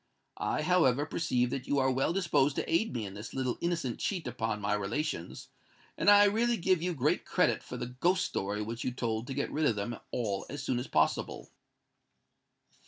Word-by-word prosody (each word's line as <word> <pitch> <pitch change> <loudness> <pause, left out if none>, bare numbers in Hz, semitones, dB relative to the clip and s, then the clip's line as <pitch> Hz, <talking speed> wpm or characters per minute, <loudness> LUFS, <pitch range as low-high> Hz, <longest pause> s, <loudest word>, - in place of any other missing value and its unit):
I, - - -1
however, 145 -7 +3
perceive 125 -7 0
that 130 -1 -4
you 145 - +1
are 130 -1 +3
well 135 +4 +1
disposed 170 -6 +2
to - - -2
aid 170 +8 +1
me 115 -4 -3
in 95 - -7
this 105 +2 -8
little 130 -2 -1
innocent 165 -8 -1
cheat 185 -5 -2
upon 110 -1 -2
my 105 0 0
relations; 105 - -3 0.5
and - - +3
I 205 0 +8
really 230 +3 +2
give 185 -2 +2
you 180 0 -1
great 130 - +1
credit - - +1
for - - -7
the 125 - -3
ghost 185 +4 +3
story 100 +2 -2
which 115 +2 -5
you - - 0
told 115 -2 -3
to 135 - -4
get 140 - -2
rid 155 0 +1
of 115 - +2
them 105 +3 -4
all 100 -5 -2
as 145 -1 -5
soon 130 -3 0
as 125 - -5
possible." - - 0
130 Hz, 200 wpm, -31 LUFS, 115-170 Hz, 0.5 s, I